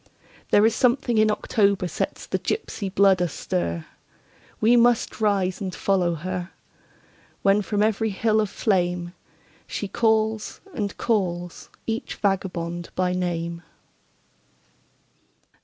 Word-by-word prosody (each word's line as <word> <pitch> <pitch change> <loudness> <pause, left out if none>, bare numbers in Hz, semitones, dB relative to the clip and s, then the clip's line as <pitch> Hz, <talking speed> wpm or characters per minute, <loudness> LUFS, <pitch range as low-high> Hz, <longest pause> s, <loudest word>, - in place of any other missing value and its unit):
There 205 - +5
is 225 - +4
something 245 -1 +2
in 215 0 +4
October 200 -3 +1
sets - - -3
the - - -2
gypsy 205 - -3
blood 195 -1 +4
astir; 85 - -2 0.7
We 230 +3 +5
must 240 -2 +3
rise 195 -3 +1
and 190 -2 -4
follow 180 -3 +1
her, 180 +2 -4 0.9
When 200 +1 +4
from 205 0 0
every 220 +1 +1
hill 215 +2 +2
of 210 - -1
flameShe 180 +1 -3
calls 220 -1 +1
and 205 -7 -3
calls 175 -6 -1 0.2
each 225 0 -3
vagabond 175 -4 -2
by 180 -1 +1
name. 170 -2 -2
195 Hz, 110 wpm, -24 LUFS, 180-220 Hz, 0.9 s, There